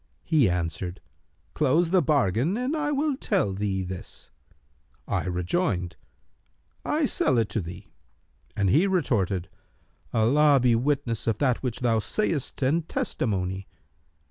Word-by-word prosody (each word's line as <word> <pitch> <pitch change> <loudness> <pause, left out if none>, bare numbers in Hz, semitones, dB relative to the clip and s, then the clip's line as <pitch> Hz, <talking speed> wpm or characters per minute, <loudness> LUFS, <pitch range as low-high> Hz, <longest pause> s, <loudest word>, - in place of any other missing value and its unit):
He 150 - +3
answered, 90 +1 -3 0.5
'Close 155 +4 +2
the 185 -1 +5
bargain, 140 - +1
and 255 +5 -1
I 300 -1 -1
will 290 0 0
tell 195 - 0
thee 95 -1 -1
this;' 90 0 -8 0.8
I - - -1
rejoined, 90 - -1 0.9
'I - - +1
sell 130 - +1
it 115 -2 +1
to 110 - -1
thee;' 90 +3 -9 0.6
and 100 -3 +1
he 165 +8 +4
retorted, 100 - 0 0.6
'Allah 140 +6 +4
be 125 -1 +3
witness 125 -3 -1
of 110 -2 +1
that 130 -2 +1
which 125 -2 -3
thou 115 -2 +2
sayst 150 - -2
and 155 +5 +1
testimony!' 95 -3 -2
120 Hz, 130 wpm, -26 LUFS, 95-160 Hz, 0.9 s, the